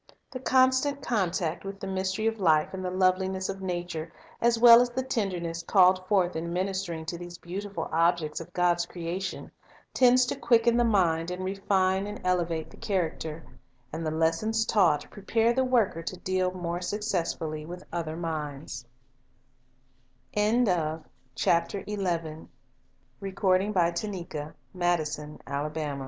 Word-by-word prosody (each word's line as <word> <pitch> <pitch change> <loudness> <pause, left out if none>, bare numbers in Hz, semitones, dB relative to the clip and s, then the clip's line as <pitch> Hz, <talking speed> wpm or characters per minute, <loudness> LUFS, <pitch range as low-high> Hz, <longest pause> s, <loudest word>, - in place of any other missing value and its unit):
The 255 - -5
constant 260 +2 +2
contact 180 -7 -1
with 195 0 -7
the - - -6
mystery 190 +2 -2
of 225 0 0
life 160 -4 +3
and 190 0 -5
the 180 - -1
loveli 185 0 +2
ness 190 0 -3
of 195 0 -5
nature, 175 -3 -4 0.3
as 235 0 +3
well 235 0 +9
as 245 - +1
the 255 +2 -2
tenderness 180 -9 -2
called 185 +1 +4
forth 185 -3 +2
in 165 +1 -3
ministering 185 -3 -2
to 170 +1 -5
these 175 0 -8
beautiful 190 -1 -5
objects 165 -1 +1
of 165 - -10
God's 175 -1 +1
creation, 180 +2 -5 0.4
tends 250 0 +5
to - - -2
quicken 235 -1 +3
the 240 - +4
mind 175 -7 +2
and 180 +1 -4
refine 190 0 +1
and 210 0 -6
elevate 170 -3 0
the - - -15
character; 165 -4 -3 0.5
and 165 +1 -4
the 155 - -1
lessons 165 +8 +1
taught 170 -11 +3
prepare 225 +3 +1
the 260 +2 +2
worker 235 -10 +1
to 180 +3 -5
deal 185 0 0
more 175 -1 -4
successfully 175 -5 -2
with 175 +3 -8
other 165 -2 -3
min 155 -4 -4
185 Hz, 125 wpm, -28 LUFS, 170-205 Hz, 0.5 s, well